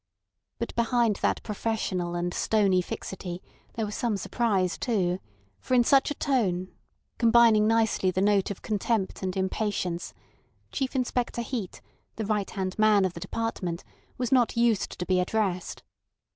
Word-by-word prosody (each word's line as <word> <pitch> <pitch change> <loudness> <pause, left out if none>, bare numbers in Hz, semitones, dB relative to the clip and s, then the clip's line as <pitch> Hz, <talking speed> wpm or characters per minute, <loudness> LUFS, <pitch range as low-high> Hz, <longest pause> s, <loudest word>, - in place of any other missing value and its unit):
But 235 - -4
behind 235 -3 +2
that - - 0
professional 200 -5 -2
and 175 0 -2
stony 200 -4 +2
fixity 180 0 -6 0.4
there 225 - -1
was 210 - -5
some 230 -3 -1
surprise 195 -6 0
too, 185 -6 0 0.4
for 255 - 0
in 245 - +6
such 270 +4 +4
a 290 - -3
tone, 190 -11 0 0.5
combining 230 -2 +5
nicely 225 -4 +2
the 185 - -1
note 200 0 +3
of 200 - -6
contempt 215 -1 -1
and 190 0 -3
impatience, 190 -2 -2 0.6
Chief 265 0 -2
Inspector 245 -2 -1
Heat, 230 -6 -5 0.3
the 220 - -3
right 210 -1 -1
hand 190 0 -4
man 215 -2 +5
of 185 - -2
the 170 - -7
department, 185 -4 -3 0.3
was 250 -2 -2
not 245 -3 +3
used 235 -3 +1
to 180 - -3
be 185 0 +2
addressed. 185 -2 -1
210 Hz, 150 wpm, -27 LUFS, 185-230 Hz, 0.6 s, in